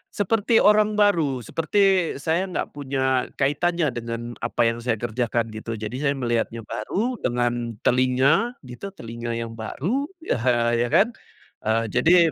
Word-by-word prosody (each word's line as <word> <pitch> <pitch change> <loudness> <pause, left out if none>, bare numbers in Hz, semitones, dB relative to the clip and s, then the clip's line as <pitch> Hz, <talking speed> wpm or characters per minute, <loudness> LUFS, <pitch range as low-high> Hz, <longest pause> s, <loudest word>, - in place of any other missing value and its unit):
seperti 225 +3 +2
orang 210 +1 +4
baru, 165 - +2
seperti 165 - -3 0.5
saya 170 +4 +1
nggak 185 - -3
punya 130 -2 -1
kaitannya 150 +3 +1
dengan 115 -1 -5 0.2
apa - - -2
yang 115 0 +1
saya 120 -1 0
kerjakan 115 0 -2
gitu. 110 +1 -5
Jadi 110 +2 -5
saya 140 -1 +1
melihatnya 120 -2 -1
baru, 215 - -3
dengan 120 -1 -1
telinga, 130 - +3
gitu, 140 +11 -9
telinga 115 -4 -5
yang 115 -1 -4
baru 195 - -2 0.2
ya 320 - -1 0.3
ya 120 +1 +1
kan. 210 - +3 0.6
Eee, 115 +1 +2
jadi, 170 - +5
130 Hz, 140 wpm, -24 LUFS, 115-175 Hz, 0.6 s, jadi